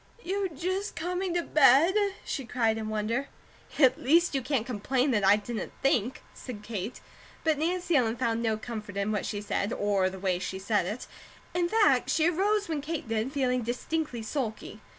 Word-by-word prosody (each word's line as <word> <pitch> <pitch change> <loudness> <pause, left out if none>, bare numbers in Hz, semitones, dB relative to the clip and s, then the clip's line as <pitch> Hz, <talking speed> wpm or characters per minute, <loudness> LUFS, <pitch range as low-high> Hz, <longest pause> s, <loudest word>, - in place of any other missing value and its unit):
"You 385 +1 -1
just 370 +6 -3
coming 360 +1 -2
to 345 - +1
bed?" 295 +4 +5 0.3
she 275 - -3
cried 225 -2 0
in 215 -1 -4
wonder. 220 +5 -1 0.5
"At 260 -3 +4
least 335 +6 +4
you 270 - 0
can't 260 -3 -1
complain 255 +3 0
that 210 -4 +1
I 195 +1 +7
didn't 215 +2 -5
think," 250 -2 +1
said 220 -5 -8
Kate, 215 +1 -5 0.4
but 315 -2 +2
Nancy 350 +1 0
Ellen 235 -4 +3
found 230 -2 0
no 220 -2 +1
comfort 215 -3 -7
in 200 +2 0
what 210 -2 -1
she 205 -1 -3
said, 205 0 -1
or 200 -4 +1
the 190 - -8
way 185 -2 0
she 185 +1 -4
said 195 -1 0
it. 215 +6 -4 0.5
In 345 -1 +1
fact, 440 +1 +3
she 320 0 +3
arose 400 +4 +1
when 315 -3 -2
Kate 300 -3 -4
did, 225 +3 -1
feeling 255 -3 +1
distinctly 245 +2 -3
sulky. 220 -3 -4
250 Hz, 185 wpm, -28 LUFS, 215-320 Hz, 0.5 s, I